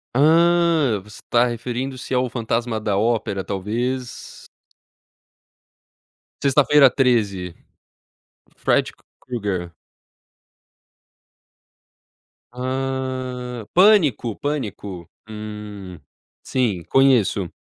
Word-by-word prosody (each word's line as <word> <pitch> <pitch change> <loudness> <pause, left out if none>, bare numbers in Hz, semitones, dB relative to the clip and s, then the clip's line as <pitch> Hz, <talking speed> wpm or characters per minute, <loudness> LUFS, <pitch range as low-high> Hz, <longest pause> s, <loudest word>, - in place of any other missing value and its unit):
Ah, 165 -4 +4
você 105 +1 -13
tá 120 0 +4
referindo-se 125 +2 -4
ao 125 0 +1
fantasma 115 -1 -2
da 105 -2 -1
Ópera, 110 -2 0
talvez? 120 +7 -4 1.9
Sexta-feira 140 +1 +5
13, 105 -9 0 1.0
Fred - - +1
K - - -29 0.2
Krueger. 100 -8 -4 2.8
Ah, 130 -2 -4
Pânico, 170 - +4
Pânico. 105 - -5 0.2
Hum, 105 -4 -8 0.4
sim, 110 -9 -1
conheço. 120 -9 +3
120 Hz, 70 wpm, -21 LUFS, 105-130 Hz, 2.8 s, Sexta-feira